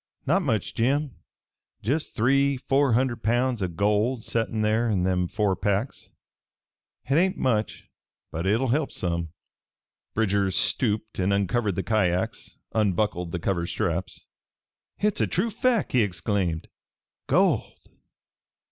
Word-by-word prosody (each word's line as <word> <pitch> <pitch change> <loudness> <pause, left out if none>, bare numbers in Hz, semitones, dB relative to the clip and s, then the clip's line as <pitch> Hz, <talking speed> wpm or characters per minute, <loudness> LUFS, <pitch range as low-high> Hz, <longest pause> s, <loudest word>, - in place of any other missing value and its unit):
"Not 175 +8 +3
much, 115 - -1
Jim. 135 +2 0 0.7
Jest 145 +9 -1
three 140 +4 +3
four 135 0 +2
hunderd 120 -1 +1
pounds 120 +1 +1
o' 95 - +1
gold 105 +7 0
settin' 115 -1 -1
there 110 +2 +2
in 95 -4 +1
them 90 -1 +1
four 105 0 0
packs. 100 +6 -2 0.9
Hit 140 +5 +2
hain't 185 +1 +1
much, 110 -6 -1 0.4
but 85 +4 -3
hit'll 115 +6 +2
help 145 +3 +1
some." 85 -2 -2 0.9
Bridger 100 -3 +2
stooped 110 +4 0
and 95 +2 +1
uncovered 100 +1 +1
the 95 - -2
kyacks, 95 -5 -1 0.2
unbuckled 100 -4 0
the 90 - -2
cover 85 0 -1
straps. 85 0 -3 0.7
"Hit's 210 -1 0
a - - +2
true 210 +6 0
fack!" 245 -2 +1
he 125 - +4
exclaimed. 90 -3 -1 0.6
"Gold! - - +2
110 Hz, 130 wpm, -25 LUFS, 95-130 Hz, 0.9 s, he